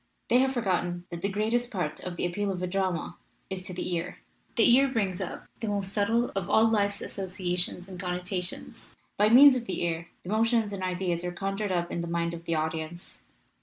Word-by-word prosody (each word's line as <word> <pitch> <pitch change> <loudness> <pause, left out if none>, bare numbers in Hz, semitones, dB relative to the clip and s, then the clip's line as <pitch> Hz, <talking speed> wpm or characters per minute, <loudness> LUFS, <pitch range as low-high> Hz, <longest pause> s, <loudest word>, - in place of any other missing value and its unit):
They 245 - +5
have 265 0 +2
forgotten 175 -6 -1
that 170 0 -5
the 200 - 0
greatest 225 +4 0
part 180 - -3
of 180 -1 -6
the - - 0
appeal 195 +3 -1
of 185 -1 -4
a - - +2
drama 185 -2 -2 0.3
is 190 -1 -3
to 185 - -5
the 180 - -2
ear. 170 +1 -3 0.4
The 225 - +5
ear 275 +1 +5
brings 205 -8 -1
up - - -5
the 225 - -3
most 200 -1 0
subtle 230 +4 +2
of 195 -3 -2
all 220 +1 +5
life's 205 -2 +1
associations 180 -1 -2
and 185 -2 -9
connotations. 180 0 -3 0.2
By 210 +1 +4
means 265 +4 +9
of 240 -2 -2
the 190 - -2
ear 170 0 -1 0.2
the 175 - -8
mo 215 +2 +3
tions 225 -3 +1
and 195 - -5
ideas 180 -2 -1
are 180 - -2
conjured 195 +3 -2
up 175 -1 -1
in 170 - -2
the 170 - -4
mind 170 0 -1
of 170 0 -8
the 165 - 0
audience. 160 +2 -4
185 Hz, 215 wpm, -28 LUFS, 175-210 Hz, 0.4 s, means